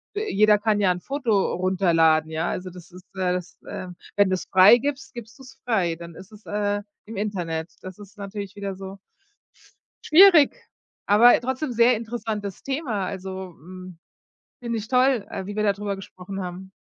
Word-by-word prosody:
jeder 215 - +3
kann 215 -1 +1
ja 190 - +3
'n 180 0 -4
Foto 245 -8 0
runterladen, 165 -4 +2
ja. 160 +2 -2
Also, 185 0 -4
das 180 0 -14
ist, 180 +1 -13
äh 180 -1 0
das, 180 -1 -6
äh 185 - -7 0.3
wenn 200 -2 +4
du's 185 -1 -2
freigibst, 240 +9 +4
gibst 235 +1 -10
du's 265 0 -14
frei, 185 -8 +1
dann 170 -1 -10
ist 190 +3 -13
es, 210 0 -16
äh, 205 0 -1 0.2
im 220 -1 -9
Internet. 175 -6 -3
Das 185 +2 -9
ist 205 +1 -14
natürlich 200 0 -7
wieder 200 -1 -5
so 195 +1 -9 1.2
schwierig, 345 -6 +8 0.5
aber 230 +5 +6
trotzdem 260 +2 -3
sehr 235 +1 +4
interessantes 220 -3 -5
Thema. 265 - -3
Also, 190 -2 -7
hm, 185 +1 -11 0.7
finde 235 -1 -2
ich 215 - -8
toll, 250 -4 +2
äh, 190 - -5
wie 205 +1 -7
wir 215 - -1
dadrüber 200 -1 -1
gesprochen 195 0 -8
haben. 185 +1 -7
200 Hz, 165 wpm, -24 LUFS, 185-225 Hz, 1.2 s, schwierig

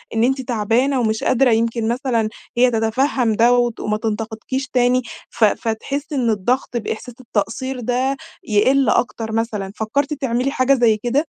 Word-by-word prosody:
إن 225 - +2
أنتِ 265 +2 +1
تعبانة 245 +3 +1
ومش 220 -2 0
قادرة، 255 0 +3
يمكن 225 0 +1
مثلًا 235 -3 0 0.3
هي 250 0 +5
تتفهم 225 +1 +1
ده، 235 +3 +4
وت 240 -2 +1
وما 210 0 -1
تنتقدكيش 225 +4 -3
تاني، 250 0 +2 0.3
ف 240 - -2
فتحس 270 +8 -2
إن 250 -5 +1
الضغط 240 +4 0
بإحساس 230 +2 -5
التقصير 250 +3 -3
ده 255 +3 0 0.3
يقل 260 +6 +3
أكتر 225 -2 0
مثلًا. 220 -3 -2
فكرتِ 280 +7 -1
تعملي 265 -1 -1
حاجة 270 0 +3
زي 235 -4 +3
كده؟ 245 +8 0
240 Hz, 155 wpm, -20 LUFS, 220-260 Hz, 0.3 s, هي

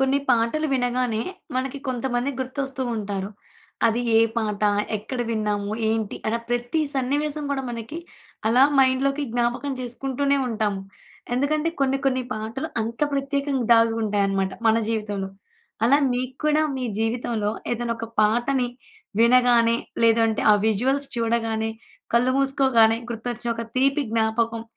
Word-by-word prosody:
కొన్ని 270 +1 +3
పాటలు 240 +7 +2
వినగానే, 245 -3 0 0.3
మనకి 265 +2 -2
కొంతమంది 250 +1 -1
గుర్తొస్తూ 265 0 -3
ఉంటారు. 200 -2 -3 0.6
అది 230 +1 +1 0.2
ఏ - - +6 0.2
పాట, 215 -2 -1 0.3
ఎక్కడ 220 +5 -6
విన్నాము, 210 -2 -1 0.2
ఏంటి 220 -2 -1
అన 225 - +1
ప్రతి 240 +6 0
సన్నివేశం 290 +3 0
గూడా 275 -1 -1
మనకి 235 +6 -6 0.5
అలా 245 +3 +5 0.2
మైండ్‍లోకి 270 +2 +3
జ్ఞాపకం 240 +4 0
చేసుకుంటూనే 270 +3 -1
ఉంటాము. 210 -4 -1 0.5
ఎందుకంటే 300 +5 +1
కొన్ని, 270 0 +2
కొన్ని 260 -1 +1
పాటలు 225 +8 -4
అంత 230 +1 -5
ప్రత్యేకంగా 275 -2 -1
దాగుంటాయన్నమాట 205 -4 +2
మన 220 0 +5
జీవితంలో. 205 -3 -2 0.6
అలా 270 +5 +5
మీక్కూడా 260 +5 0
మీ 255 - -3
జీవితంలో 225 -2 -1 0.2
ఏదైనా 240 0 -2
ఒక 230 - -4 0.2
పాటని 245 +4 +2 0.5
వినగానే 235 -1 +5 0.3
లేదంటే, 225 -1 +3
ఆ - - +6
విజువల్స్ 265 +6 +1
చూడగానే, 225 -1 0 0.4
కళ్ళు 250 +2 +4
మూసుకోగానే 265 -5 +4
గుర్తొచ్చే 235 +1 -4
ఒక 230 - -4
తీపి 275 +2 +2
జ్ఞాపకం, 225 0 0
240 Hz, 120 wpm, -24 LUFS, 225-270 Hz, 0.6 s, ఏ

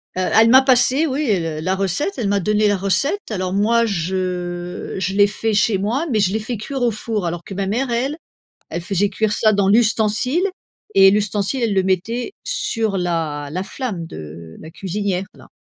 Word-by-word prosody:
elle 220 +5 +4
m'a 260 +2 +8
passé 260 +3 +3
oui, 275 -1 -1
heu, 165 -5 -1
la 185 +3 0
recette, 195 - -1
elle 220 -5 -1
m'a 200 -1 +1
donné 210 +2 +2
la 205 - +2
recette 225 - -1
alors 185 -2 -2
moi 230 +3 +3
je 180 -1 -3
je 190 +1 -1
l'ai 205 0 +5
fait 220 +2 -2
chez 200 0 +2
moi, 235 - -1
mais 215 - +2
je 195 0 +2
l'ai 220 - 0
fait 220 +1 -4
cuire 265 +5 -5
au 240 -1 +2
four 215 -2 -3
alors 170 0 -3
que 195 - -8
ma 195 0 -2
mère, 245 +5 -1
elle 265 +6 -1 0.5
elle 170 - -3
faisait 195 +3 0
cuire 215 +1 0
ça 215 0 +3
dans 200 -1 +2
l'ustensile 225 - +2 0.5
et 195 0 +7
l'ustensile 210 +4 0
elle 215 -3 +1
le 190 - +3
mettait 210 - -1
sur 225 - -1
la 160 -5 -2
la 185 +2 -2
flamme 195 -7 -5
de 80 - -10
la 160 - -10
cuisinière 195 +1 -3
là - - -16
205 Hz, 195 wpm, -20 LUFS, 185-230 Hz, 0.5 s, m'a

